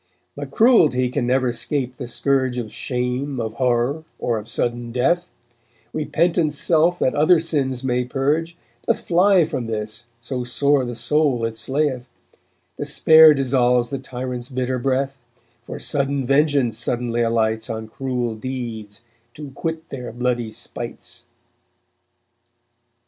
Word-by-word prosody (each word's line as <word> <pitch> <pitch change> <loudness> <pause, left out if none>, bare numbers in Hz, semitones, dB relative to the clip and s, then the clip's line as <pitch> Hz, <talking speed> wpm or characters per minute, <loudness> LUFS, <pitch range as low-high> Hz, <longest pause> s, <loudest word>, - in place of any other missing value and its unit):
But - - -6
cruelty 160 - +4
can 125 -1 -2
never 130 0 +2
'scape 125 0 -2
the 125 - -6
scourge 130 0 0
Of 115 -4 -4
shame, 125 +1 -2
of 110 -1 -3
horror, 125 +4 +1
or 115 -2 -1
of 105 - -9
sudden 120 0 -1
death; 170 +9 +1 0.6
Repentance 155 0 +1
self 170 +3 +3
that 130 - +1
other 160 +4 +4
sins 135 -6 0
may 125 -1 0
purge 150 +6 -1 0.3
Doth - - +2
fly 180 0 +4
from 125 -6 -4
this, 110 +1 -3
so 125 +1 -4
sore 140 +2 +1
the 120 -1 -5
soul 125 0 +1
it 115 0 -4
slayeth; 130 +1 -1 0.7
Despair 160 -1 +6
dissolves 125 -3 +2
the 135 - -3
tyrant's 125 -1 -5
bitter 130 -1 -2
breath, 135 +1 -1 0.4
For 120 - -8
sudden 140 -1 -1
vengeance 140 -4 +2
suddenly 120 0 0
alights 110 -1 0
On 110 -1 -4
cruel 125 0 -3
deeds 115 -3 -6 0.3
to 145 -2 -8
quit 160 +3 -5
their 125 -3 -6
bloody 120 -1 -1
spites_. 115 +1 -5
130 Hz, 135 wpm, -21 LUFS, 120-145 Hz, 0.7 s, Despair